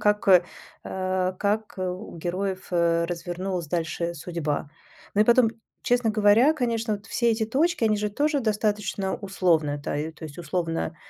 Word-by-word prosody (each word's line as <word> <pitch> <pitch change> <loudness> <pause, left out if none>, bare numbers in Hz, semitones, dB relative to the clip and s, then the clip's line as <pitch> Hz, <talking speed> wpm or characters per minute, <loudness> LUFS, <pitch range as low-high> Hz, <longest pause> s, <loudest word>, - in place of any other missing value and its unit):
как, 210 -1 +2
э, 180 -2 +7 0.4
э, 185 0 -1
как, 210 +1 -1
э, 185 - -1
у 180 +1 -6
героев, 185 +3 -3
э, 170 -1 +2
развернулась 175 +1 -3
дальше 170 +1 -2
судьба. 155 -3 -3 0.5
Ну 205 - +3
и - - 0
потом, 235 -1 +5 0.3
честно 245 -2 +2
говоря, 215 +6 +5
конечно, 230 -6 -1
вот 200 +1 -17
все 235 0 +1
эти 220 0 +1
точки, 300 +4 +1
они 215 -1 +3
же 210 0 -1
тоже 290 +6 +1
достаточно 210 -3 -1
условны. 170 -7 +1
Да, - - -3 0.2
то 160 - -11
есть 150 0 -9
условно 165 0 -2
195 Hz, 160 wpm, -25 LUFS, 175-220 Hz, 0.5 s, э